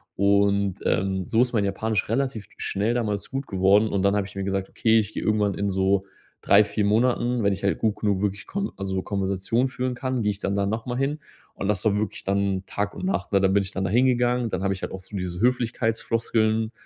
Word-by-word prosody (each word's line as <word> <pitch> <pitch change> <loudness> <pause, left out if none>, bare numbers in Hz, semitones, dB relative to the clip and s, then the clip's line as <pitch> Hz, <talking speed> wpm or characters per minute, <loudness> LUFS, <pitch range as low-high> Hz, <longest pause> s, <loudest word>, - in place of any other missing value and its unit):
Und, 100 -1 +2
ähm, 95 -1 0
so 115 -1 +3
ist 125 - -4
mein 105 -3 +2
Japanisch 105 +1 -1
relativ 120 -4 -1
schnell 105 +4 -1
damals 105 -4 -2
gut 135 0 -3
geworden 100 +3 +3
und 100 - 0
dann 100 +1 +3
habe 100 - 0
ich 100 - -15
mir 100 - -3
gesagt: 95 -1 -1
„Okay, 115 -1 +3
ich 110 0 -3
gehe - - -4
irgendwann 105 -2 +1
in 100 0 -1
so 95 0 +1 0.4
3, 100 +1 +6
4 105 0 -1
Monaten, 120 +2 +2
wenn 100 - +3
ich 100 - -7
halt 100 - +1
gut 110 -2 0
genug 100 -2 +1
wirklich 100 -1 -2
Kon 200 0 -3
also 95 -1 -2
Konversation 100 +5 0
führen 130 -1 -2
kann, 130 -2 -2
gehe 105 - +2
ich 100 - -7
dann 100 - -1
da 100 0 +1
nochmal 115 +4 -3
hin“ 140 +3 -1 0.4
und 100 - -3
das 105 -3 0
war 105 -2 +3
wirklich 105 -1 -3
dann 100 -1 0
Tag 100 0 -3
und - - -5
Nacht, 190 - -2
ne? 100 - +4
Dann 95 0 +3
bin 100 - +4
ich 95 - -7
dann 95 - -3
da - - -1
hingegangen, 125 0 +2
dann 95 -1 -3
habe 95 - +1
ich 95 - -8
halt - - -3
auch 95 - -6
so 100 +2 -8
diese 90 -1 -4
Höflichkeitsfloskeln, 115 -2 0
105 Hz, 235 wpm, -24 LUFS, 100-115 Hz, 0.4 s, 3